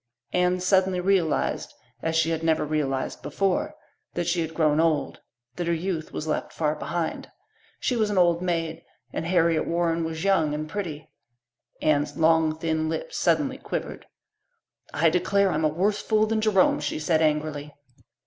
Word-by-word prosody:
Anne 180 0 +2
suddenly 185 0 +2
realized, 180 -4 0 0.3
as 160 0 -1
she 160 0 +2
had 165 -1 -1
never 160 -2 +1
realized 145 -3 -2
before, 180 +8 -1 0.4
that 175 - -1
she 170 0 +1
had 160 0 -4
grown 155 -2 +3
old 160 -3 +1 0.4
that 175 - -2
her 170 - +2
youth 165 -1 -3
was 155 - -4
left 155 - -2
far 150 -2 0
behind. 165 +2 -3 0.5
She 250 - 0
was 215 -3 +1
an 205 - -1
old 175 -1 +4
maid, 165 -3 -2 0.3
and 165 - -3
Harriet 170 -2 +2
Warren 170 -1 0
was 160 0 -4
young, 165 -7 +2
and 155 +1 -4
pretty. 160 -5 -5 0.8
Anne's 150 -1 +1
long, 160 -1 +3
thin 160 -1 -1
lips 160 -1 -4
suddenly 160 -4 +1
quivered. - - -5 0.8
"I 160 +2 +3
declare, 195 +2 +2
I'm 155 -1 0
a - - +6
worse 190 +7 0
fool 215 -1 +2
than 220 0 0
Jerome," 210 -7 +3
she 150 0 -2
said 155 +1 +1
angrily. 150 -1 0
165 Hz, 165 wpm, -25 LUFS, 155-180 Hz, 0.8 s, a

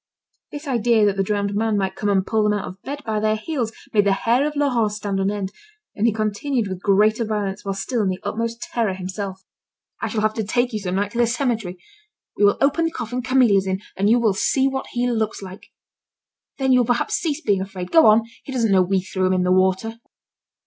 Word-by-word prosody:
This 295 +1 -8
idea 235 -4 +3
that 200 -1 +2
the 195 - 0
drowned 200 0 -1
man 215 0 0
might 190 -1 -1
come 205 +1 -2
and 190 -2 +2
pull 220 +1 +1
them 210 0 +2
out 205 - -3
of 190 +2 -10
bed 285 +1 -6
by 220 -2 -1
the 215 0 +1
heels, 235 0 -3 0.2
made 205 -2 +4
the 195 - +4
hair 240 +8 +1
of 300 - -5
Laurent 250 -7 +1
stand 205 -2 -3
on 195 0 +1
end, 200 -2 -3 0.4
and 220 +3 +1
he - - +3
continued 215 +3 -1
with 185 -1 -6
greater 215 +3 +3
violence, 210 -3 -3
while 195 -1 -3
still 230 +4 -2
in 205 - +1
the 185 - -2
utmost 230 +3 -3
terror 220 -5 -1
himself. 190 +1 -6 0.6
"I - - -1
shall 220 - -2
have 215 0 +1
to 220 - -2
take 240 +4 0
you 215 - -1
some 185 -2 -3
night 200 +1 -1
to 235 - -4
the 240 - +4
cemetery. 230 -6 -2 0.6
We - - 0
will 205 - +5
open 290 +4 +2
the - - +1
coffin 245 -2 -4
Camille 250 -5 +4
is 195 0 0
in, 190 0 -1 0.2
and 200 +2 +1
you 235 - +5
will 225 -4 +2
see 265 +7 +1
what 265 0 -3
he 245 0 -2
looks 220 -4 -1
like! 190 0 -10 0.9
Then 265 -1 +1
you 255 - +5
will 245 - +1
perhaps 245 -1 0
cease 310 -4 -1
being 200 - +1
afraid. 190 -2 -6
Go 325 -6 +7
on, 215 +1 +6 0.2
he - - -8
doesn't 230 -5 +1
know 190 -1 +5
we 190 +1 +1
threw 185 0 -1
him 185 - +2
in 185 -1 +1
the 180 - +1
water." 190 +5 +1
215 Hz, 240 wpm, -22 LUFS, 195-240 Hz, 0.9 s, Go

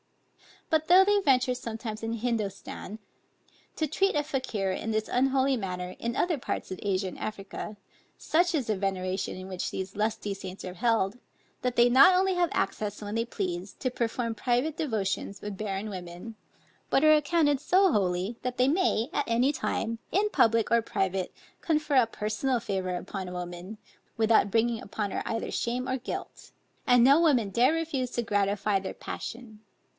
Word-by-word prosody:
But 315 0 +2
though 365 +2 +8
they 410 +1 +3
venture 260 -7 +3
sometimes 225 -3 -6
in 225 0 -2
Hindostan, 215 -3 -3 0.8
to 315 - 0
treat 390 +6 +1
a 295 - +2
Fakier 255 -9 -2
in 205 +4 -3
this 215 0 -1
unholy 265 +1 +2
manner, 180 -3 -4
in 235 +1 -2
other 335 -2 +1
parts - - -4
of 185 - -5
Asia 195 -1 0
and - - -11
Africa, 210 0 -6 0.4
such 345 +2 +2
is 275 -5 0
the 215 -2 0
veneration 185 -1 -2
in 185 0 -8
which 185 -2 -3
these 190 0 -5
lusty 210 -1 -1
saints 190 -1 -8
are 180 - -5
held, 225 +1 +1 0.4
that 250 -1 -1
they 240 0 +5
not 275 +10 +7
only 380 +1 +3
have 350 -1 +2
access 205 +1 -2
when 205 0 -5
they 230 +1 0
please, 190 -4 -4
to 255 - -3
perform 235 -1 -2
private 250 +6 0
devotions 200 -8 -2
with 205 -2 -6
barren 205 0 -3
women, 180 +3 -8 0.5
but 270 - +3
are 310 0 +7
accounted 300 -1 +3
so 370 +5 +4
holy, 190 +1 0
that 250 0 -3
they 255 +1 +4
may 300 - +1
at 290 - 0
any 240 +4 +3
time, 230 -5 -2
in 415 +3 +2
public 230 - +3
or 235 0 +5
private, 190 -4 -1 0.3
confer 300 -3 +1
a 245 -3 +5
personal 225 +4 -1
favor 190 -3 -2
upon 190 +1 -5
a 180 - -7
woman, 180 +3 -6 0.4
without 220 -2 +4
bringing 225 +2 +1
upon 205 0 -4
her - - -2
either 225 - -3
shame 250 +2 -2
or 260 0 0
guilt; 250 - -7 0.3
and 245 -1 +6
no 275 +5 +7
woman 270 -11 +3
dare 245 +9 +3
refuse 310 -6 -1
to 240 -1 -2
gratify 205 -1 +1
their 190 - -6
passion. 230 -3 -7
230 Hz, 175 wpm, -28 LUFS, 195-270 Hz, 0.8 s, though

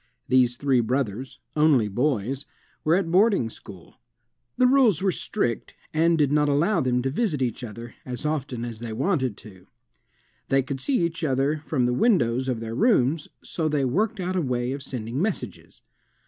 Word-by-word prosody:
These 125 -1 +3
three 135 -2 +2
brothers, 125 0 -2 0.2
only 150 -8 +4
boys, 130 +3 -1 0.4
were 160 +2 +3
at 180 -3 0
boarding 190 - +3
school. 95 -7 -13 0.6
The 255 - +4
rules 250 - +4
were 195 - +3
strict, 120 - -3 0.2
and 165 +1 +3
did 145 -3 +2
not 150 0 +3
allow 165 +7 +2
them 125 -2 0
to 135 - -1
visit 170 - 0
each 125 -1 -2
other 115 +1 -8
as 125 +3 -6
often 135 -6 -2
as 115 -2 -7
they 115 -1 -5
wanted 130 - 0
to. 95 -4 -15 0.8
They 135 0 +3
could 135 0 -5
see 255 -11 +1
each 165 +1 -4
other 140 +1 +1
from 130 -6 +1
the 125 - +1
windows 130 - +2
of 125 -3 -2
their 115 0 -5
rooms 150 - +2 0.2
so 160 -2 -2
they 145 -3 +1
worked 205 - 0
out 185 0 -2
a 180 - +1
way 125 -3 -1
of 140 +1 -4
sending 125 0 -4
messages. 175 - -4
135 Hz, 175 wpm, -25 LUFS, 120-165 Hz, 0.8 s, only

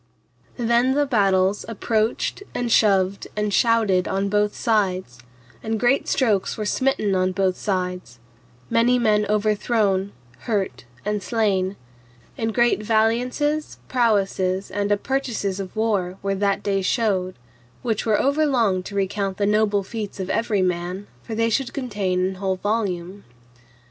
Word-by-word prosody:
Then 240 +2 +2
the 290 0 +3
battles 195 -5 +2
approached 225 - -1
and 240 -1 -1
shoved 195 -3 +3
and 210 -1 -1
shouted 215 -5 +3
on 195 +1 -1
both 210 0 +1
sides, 185 - 0 0.4
and 220 0 -2
great 245 +4 +2
strokes 215 -7 +1
were 215 - -3
smitten 215 -3 +1
on 185 0 +1
both 190 -1 +1
sides, 180 - -3 0.5
many 240 - +3
men 210 -3 +2
overthrown, 210 -2 +1 0.3
hurt, 195 - -2 0.2
and 210 0 -1
slain; 200 -4 0 0.6
and 225 0 -2
great 240 -1 +2
valiances, 245 +8 0
prowesses 195 -5 +1
and 205 0 -1
appertices 205 -3 -1
of 190 +1 -6
war 200 -5 0
were 195 0 0
that 200 0 0
day 195 -1 0
showed, 190 -3 0 0.5
which 225 -4 -1
were 215 -2 +2
over 295 +3 +2
long 225 -9 +2
to 200 +2 -9
recount 195 0 -1
the 205 - +1
noble 210 -1 +2
feats 205 0 -6
of 190 0 -3
every 215 -4 +1
man, 180 +2 -2 0.2
for 225 - -6
they 230 +1 +1
should 265 +1 -1
contain 200 -9 -1
an 190 0 -2
whole 190 -1 0
volume. 195 -2 -2
205 Hz, 140 wpm, -23 LUFS, 190-230 Hz, 0.6 s, the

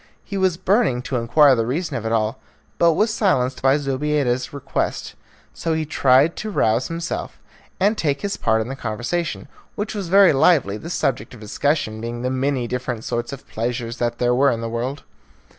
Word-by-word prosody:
He 200 - -7
was 190 -3 +1
burning 185 - +1
to 130 - -2
inquire 130 +4 +5
the 115 - +1
reason 160 +7 -2
of 115 -1 -3
it - - -2
all, 110 -1 0 0.4
but 170 -1 +5
was 215 +6 +1
silenced 135 - +1
by 135 +2 +4
Zobeida's 135 -2 -1
request, 140 -2 -3 0.4
so 165 - -2
he 160 0 -1
tried 140 +2 +3
to 215 - -4
rouse 120 - +1
himself 165 +1 -4 0.4
and 205 +3 +3
to - - -3
take 145 -3 0
his 200 -1 -2
part 110 -1 +1
in 110 - -4
the 135 - -5
conversation, 120 - -3 0.3
which 210 +1 -3
was 200 -4 -4
very 195 -1 +6
lively, 135 - +3
the 165 - -8
subject 125 -8 -2
of - - -13
discussion 110 0 -1
being 120 +1 -5
the 125 - 0
many 130 -1 0
different 125 -2 -4
sorts 120 0 -3
of 140 -1 -9
pleasures 120 +1 -3
that 120 -1 -1
there 120 0 +2
were 140 +3 +4
in 115 -2 -1
the 115 - -3
world. 125 +5 -3
135 Hz, 195 wpm, -21 LUFS, 120-165 Hz, 0.4 s, very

